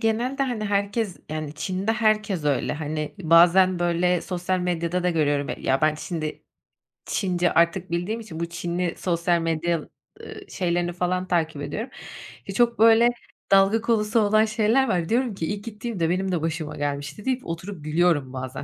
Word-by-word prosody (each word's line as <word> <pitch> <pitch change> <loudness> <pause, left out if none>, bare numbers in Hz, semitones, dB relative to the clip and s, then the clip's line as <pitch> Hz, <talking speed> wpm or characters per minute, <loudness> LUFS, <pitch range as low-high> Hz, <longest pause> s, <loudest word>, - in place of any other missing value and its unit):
genelde, 240 +5 0
hani, 245 -5 -2
herkes, 200 0 -1
yani, 155 -1 -4
Çin'de 185 +7 -2
herkes 215 -7 +1
öyle. 145 -3 +1
Hani, 155 0 -4
bazen 175 +3 +5
böyle 175 0 +1
sosyal 185 0 -2
medyada 175 0 -1
da 180 - +2
görüyorum. 145 -3 +1
E, - - -3
ya, 135 +1 +1
ben 155 0 +3
Çinde 155 -1 -5 0.6
Çince 180 -3 0
artık 170 +2 +2
bildiğim 175 +7 -2
için 185 -8 -8
bu 170 - -1
Çinli 175 0 -2
sosyal 170 -1 0
medya, 165 +1 0 0.4
ııı, 430 -2 -10
şeylerini 175 -1 -1
falan 180 +1 -1
takip 160 -4 0
ediyorum. 225 - -4 0.6
Ya, 195 - -5
çok 235 -2 +2
böyle 230 +1 +6 0.4
dalga 195 +3 +5
konusu 225 -1 +1
olan 215 +1 +4
şeyler 220 +5 +2
var. 175 -3 0
Diyorum 240 -2 +1
ki: 165 - -3
"İlk 205 0 -7
gittiğimde 215 -6 -3
benim 190 +1 0
de 175 - -1
başıma 160 -1 -3
gelmişti." 145 +6 -4
deyip 260 -1 -1
oturup 170 0 -6
gülüyorum 155 -4 +1
bazen, 130 0 -5
180 Hz, 165 wpm, -24 LUFS, 165-215 Hz, 0.6 s, böyle